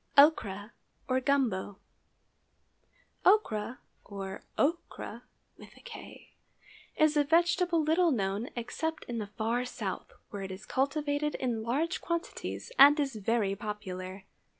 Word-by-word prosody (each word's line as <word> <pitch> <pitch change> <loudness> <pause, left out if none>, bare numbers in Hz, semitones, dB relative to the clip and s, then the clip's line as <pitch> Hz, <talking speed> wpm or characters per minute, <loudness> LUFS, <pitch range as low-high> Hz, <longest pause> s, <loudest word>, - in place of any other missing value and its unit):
OCHRA, 220 -9 +5 0.4
OR 255 0 +2
GUMBO. 240 -9 +1 1.5
Ochra, 250 - +3 0.3
or 195 -1 -6 0.2
okra, 335 +4 -1 1.7
is 310 -1 +4
a 295 - +5
vegetable 345 +2 +3
little 330 +3 +4
known 205 -3 -1
except 320 +7 -3
in 235 -1 -4
the 210 - -4
far 225 +4 -1
South, 250 - -5 0.2
where 205 - -5
it 195 - -5
is 190 +2 -8
cultivated 290 +2 0
in 240 -4 -1
large 290 - -1
quantities 340 +7 -4
and 290 +2 +9
is 275 -2 0
very 215 -1 0
popular. 190 -3 -6
250 Hz, 110 wpm, -30 LUFS, 205-305 Hz, 1.7 s, and